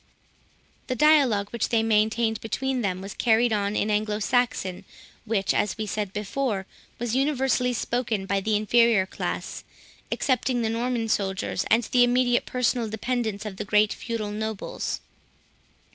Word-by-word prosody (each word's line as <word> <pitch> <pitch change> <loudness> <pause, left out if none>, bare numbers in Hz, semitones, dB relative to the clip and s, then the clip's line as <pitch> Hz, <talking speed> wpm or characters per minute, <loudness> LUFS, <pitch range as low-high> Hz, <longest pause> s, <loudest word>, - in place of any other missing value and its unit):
The 255 - -1
dialogue 255 -9 +4
which 235 - -1
they 225 -2 +2
maintained 220 0 +1
between 255 +4 -2
them, 185 -3 -2
was 195 +1 -7
carried 230 0 +3
on 205 0 0
in 215 - 0
Anglo 210 0 0
Saxon, 220 -5 0 0.4
which, 205 -4 0
as 205 - 0
we 220 - -2
said 205 -1 -3
before, 210 0 -2 0.3
was 240 0 -2
universally 265 -2 +1
spoken 235 -4 -1
by 195 0 0
the 215 +2 0
inferior 220 -1 +4
classes, - - -5 0.5
excepting 250 -2 0
the 220 - 0
Norman 235 0 -1
soldiers, 195 -3 -1
and 230 +2 +4
the 245 +2 +3
immediate 245 0 +2
personal 245 -2 0
dependants 220 -1 -2
of 200 -3 -6
the - - -3
great 210 +1 +3
feudal 225 -3 -4
nobles. 220 0 -4
220 Hz, 145 wpm, -25 LUFS, 210-245 Hz, 0.5 s, dialogue